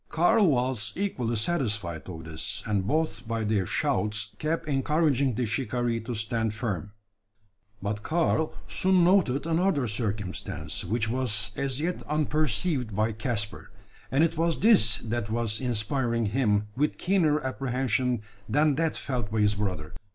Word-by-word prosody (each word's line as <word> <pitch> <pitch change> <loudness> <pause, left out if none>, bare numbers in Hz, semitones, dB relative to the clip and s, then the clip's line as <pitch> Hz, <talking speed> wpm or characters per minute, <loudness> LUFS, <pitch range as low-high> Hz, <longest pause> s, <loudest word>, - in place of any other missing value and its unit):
Karl 195 +5 +4
was 125 -6 0
equally 125 - -1
satisfied 105 - -2
of 80 -2 -7
this; 80 0 -5
and 100 -3 0
both 140 -5 -1
by 115 -1 -1
their 105 -4 +1
shouts 105 0 0
kept 160 +2 -1
encouraging 140 -2 +2
the 125 +1 0
shikaree 120 0 -1
to 120 +1 -4
stand 110 0 -1
firm. 105 -4 -3 0.9
But 105 +1 -2
Karl 160 +2 +1 0.2
soon 185 -1 +3
noted 170 -7 +3
another 165 -4 +2
circumstance, 105 -5 -3
which 110 +4 -1
was 110 -3 0
as 135 -1 -2
yet 175 +3 -2
unperceived 150 - 0
by 110 +2 +1
Caspar, 110 -2 -3 0.4
and 135 +5 +3
it 165 -1 +1
was 165 0 +1
this 195 - +6
that 115 -1 -2
was 110 0 -1
inspiring 120 0 0
him 105 -2 +1
with 150 +3 0
keener 170 -5 +2
apprehension 130 -3 -1 0.3
than 150 +1 +3
that 165 -1 0
felt 125 -6 -3
by 110 -1 +1
his 105 0 +4
brother. 95 -6 -3
120 Hz, 145 wpm, -27 LUFS, 105-150 Hz, 0.9 s, this